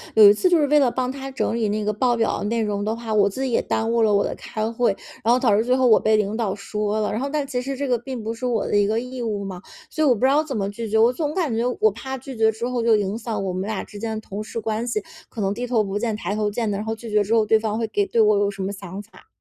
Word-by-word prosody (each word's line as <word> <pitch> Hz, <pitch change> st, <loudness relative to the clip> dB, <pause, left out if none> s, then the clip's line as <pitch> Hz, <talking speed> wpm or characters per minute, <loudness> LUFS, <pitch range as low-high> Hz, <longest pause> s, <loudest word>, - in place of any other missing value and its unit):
有 215 Hz, -2 st, +9 dB
一 205 Hz, -, +7 dB
次 365 Hz, -, +2 dB
就 350 Hz, -, +5 dB
是 290 Hz, -, +2 dB
为 300 Hz, +1 st, +5 dB
了 265 Hz, -4 st, +4 dB
帮 255 Hz, +1 st, -2 dB
他 270 Hz, 0 st, -7 dB
整 260 Hz, -, -1 dB
理 225 Hz, -2 st, 0 dB
那 210 Hz, +1 st, -1 dB
个 210 Hz, -, +1 dB
报 240 Hz, +3 st, +1 dB
表 225 Hz, -, 0 dB
的 -, -, -3 dB
内 230 Hz, +2 st, 0 dB
容 205 Hz, -1 st, -2 dB
的 220 Hz, +1 st, -1 dB
话， 230 Hz, -1 st, -5 dB
我 205 Hz, -1 st, +4 dB
自 260 Hz, +7 st, -4 dB
己 260 Hz, -, -1 dB
也 -, -, +2 dB
耽 225 Hz, +1 st, -1 dB
误 235 Hz, 0 st, +2 dB
了 215 Hz, -2 st, +3 dB
我 200 Hz, -, +3 dB
的 -, -, -2 dB
开 215 Hz, 0 st, -4 dB
会， 235 Hz, -3 st, +1 dB, 0.3 s
然 230 Hz, +3 st, +4 dB
后 -, -, +4 dB
导 225 Hz, -6 st, +3 dB
致 220 Hz, -, +1 dB
最 250 Hz, -, +3 dB
后 260 Hz, -1 st, +3 dB
我 220 Hz, -, +6 dB
被 220 Hz, 0 st, +3 dB
领 210 Hz, +1 st, 0 dB
导 210 Hz, -5 st, -1 dB
说 210 Hz, +1 st, -2 dB
了。 210 Hz, -, -1 dB
然 215 Hz, -, -2 dB
后 275 Hz, +2 st, -2 dB
但 295 Hz, -1 st, -1 dB
其 255 Hz, -3 st, -3 dB
实 275 Hz, +2 st, -4 dB
这 280 Hz, +1 st, -3 dB
个 245 Hz, -, +2 dB
并 240 Hz, 0 st, -6 dB
不 225 Hz, +1 st, -3 dB
是 240 Hz, +2 st, -6 dB
我 235 Hz, -4 st, 0 dB
的 205 Hz, -, +1 dB
一 205 Hz, -, +4 dB
个 220 Hz, +2 st, +1 dB
义 250 Hz, 0 st, -6 dB
务 210 Hz, -3 st, -2 dB
嘛， 185 Hz, -2 st, -7 dB, 0.3 s
所 310 Hz, -, -1 dB
以 -, -, +4 dB
我 255 Hz, -, +6 dB
不 205 Hz, -, -8 dB
知 260 Hz, -, +5 dB
道 295 Hz, -, +4 dB
怎 275 Hz, -5 st, -5 dB
么 200 Hz, -2 st, -1 dB
拒 220 Hz, +2 st, -6 dB
绝， 220 Hz, -, +1 dB
我 230 Hz, +2 st, +5 dB
总 295 Hz, +3 st, -2 dB
感 330 Hz, -10 st, 0 dB
觉 230 Hz, +2 st, 0 dB, 0.2 s
我 215 Hz, -, +5 dB
怕 265 Hz, +5 st, -6 dB
拒 260 Hz, -1 st, -9 dB
绝 220 Hz, 0 st, +4 dB
之 235 Hz, +3 st, -4 dB
后 245 Hz, -2 st, -1 dB
就 230 Hz, -1 st, +5 dB
影 205 Hz, +1 st, -1 dB
响 220 Hz, -4 st, -3 dB
我 190 Hz, -, -2 dB
们 185 Hz, +3 st, -3 dB
俩 215 Hz, -2 st, -3 dB
之 205 Hz, -, -11 dB
间 220 Hz, 0 st, -3 dB
的 220 Hz, -, -5 dB
同 200 Hz, 0 st, -6 dB
事 230 Hz, +1 st, -5 dB
关 220 Hz, +2 st, -2 dB
系， 215 Hz, -3 st, -1 dB, 0.3 s
可 225 Hz, -, -6 dB
能 195 Hz, 0 st, 0 dB
低 245 Hz, +3 st, -4 dB
头 230 Hz, -3 st, +2 dB
不 200 Hz, +1 st, -3 dB
见 225 Hz, -2 st, -1 dB
抬 205 Hz, -, -3 dB
头 210 Hz, -1 st, 0 dB
见 225 Hz, +1 st, -2 dB
的， 200 Hz, -, -2 dB
然 210 Hz, -, -4 dB
后 225 Hz, 0 st, -2 dB
拒 225 Hz, 0 st, -9 dB
绝 210 Hz, 0 st, +3 dB
之 210 Hz, +3 st, -1 dB
后， 220 Hz, -2 st, +4 dB
对 220 Hz, +1 st, +4 dB
方 215 Hz, 0 st, -2 dB
会 225 Hz, -1 st, -1 dB
给 205 Hz, -1 st, 0 dB
对 230 Hz, -, +2 dB
我 210 Hz, -1 st, +4 dB
有 200 Hz, 0 st, +2 dB
什 195 Hz, -1 st, -7 dB
么 195 Hz, -, -2 dB
想 195 Hz, 0 st, -7 dB
法。 210 Hz, -, -19 dB
220 Hz, 370 characters per minute, -23 LUFS, 210-245 Hz, 0.3 s, 有